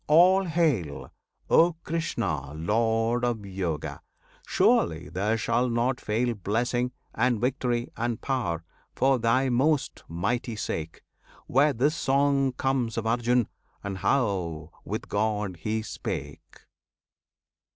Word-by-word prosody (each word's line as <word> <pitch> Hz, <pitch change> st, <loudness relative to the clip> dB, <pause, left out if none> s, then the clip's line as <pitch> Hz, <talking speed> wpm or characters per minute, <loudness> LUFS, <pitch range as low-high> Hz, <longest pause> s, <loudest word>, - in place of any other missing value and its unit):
all 185 Hz, +5 st, +6 dB
hail! 150 Hz, -, 0 dB, 0.4 s
O 170 Hz, +1 st, +5 dB
Krishna, 115 Hz, -, -2 dB
Lord 115 Hz, +7 st, +1 dB
of 115 Hz, -4 st, -1 dB
Yoga! 95 Hz, -5 st, -3 dB, 0.5 s
surely 80 Hz, -2 st, +2 dB
there 100 Hz, +7 st, 0 dB
shall 120 Hz, +2 st, +1 dB
not 120 Hz, +2 st, 0 dB
fail 120 Hz, +3 st, 0 dB
Blessing, 120 Hz, +5 st, -1 dB, 0.2 s
and 120 Hz, 0 st, +1 dB
victory, 125 Hz, -1 st, 0 dB
and 120 Hz, -1 st, -2 dB
power, 100 Hz, -12 st, -2 dB, 0.3 s
for 135 Hz, 0 st, +3 dB
Thy 115 Hz, +4 st, +2 dB
most 135 Hz, +4 st, +1 dB
mighty 110 Hz, +8 st, -2 dB
sake, 80 Hz, -6 st, -4 dB, 0.4 s
Where 145 Hz, +4 st, +4 dB
this 140 Hz, +6 st, +1 dB
song 140 Hz, -1 st, +2 dB
comes 125 Hz, -3 st, -1 dB
of 115 Hz, -, -1 dB
Arjun, 120 Hz, 0 st, +2 dB, 0.4 s
and 95 Hz, -1 st, -4 dB
how 95 Hz, -, 0 dB
with -, -, -4 dB
God 105 Hz, -3 st, -1 dB
he 110 Hz, +6 st, -2 dB
spake. -, -, -6 dB
120 Hz, 115 wpm, -27 LUFS, 100-130 Hz, 0.5 s, all